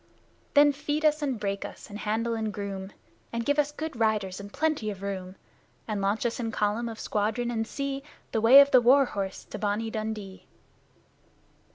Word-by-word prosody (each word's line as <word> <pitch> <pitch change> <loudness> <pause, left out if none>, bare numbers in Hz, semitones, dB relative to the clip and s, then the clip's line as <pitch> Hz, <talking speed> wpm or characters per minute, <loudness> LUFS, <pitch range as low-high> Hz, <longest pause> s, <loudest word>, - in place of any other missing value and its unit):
Then 290 0 +7
feed 295 +2 -2
us 305 0 +3
and 270 -6 -1
break 200 -1 -2
us - - -9
and 205 0 -8
handle 225 +2 -1
and 220 -1 -2
groom, 200 -1 -5 0.4
And 235 0 -3
give 285 +1 +2
us 295 0 +2
good 310 0 -5
riders 210 -4 0
and 200 0 -9
plenty 305 -7 0
of 200 -2 -7
room, 190 -2 -5 0.5
And 210 -3 -2
launch 200 +4 0
us 235 +1 -1
in 230 -2 -2
column 215 +3 0
of 225 -1 -8
squadron 225 +3 -1
and 225 -1 -2
see 275 +1 -3 0.3
The 220 - 0
way 255 +5 +10
of 280 0 +3
the 255 - +7
war 270 +4 +6
horse 195 -5 -4
to 210 - -8
"Bonnie 210 +2 -1
Dundee"! 215 -3 -5
225 Hz, 190 wpm, -27 LUFS, 205-270 Hz, 0.5 s, way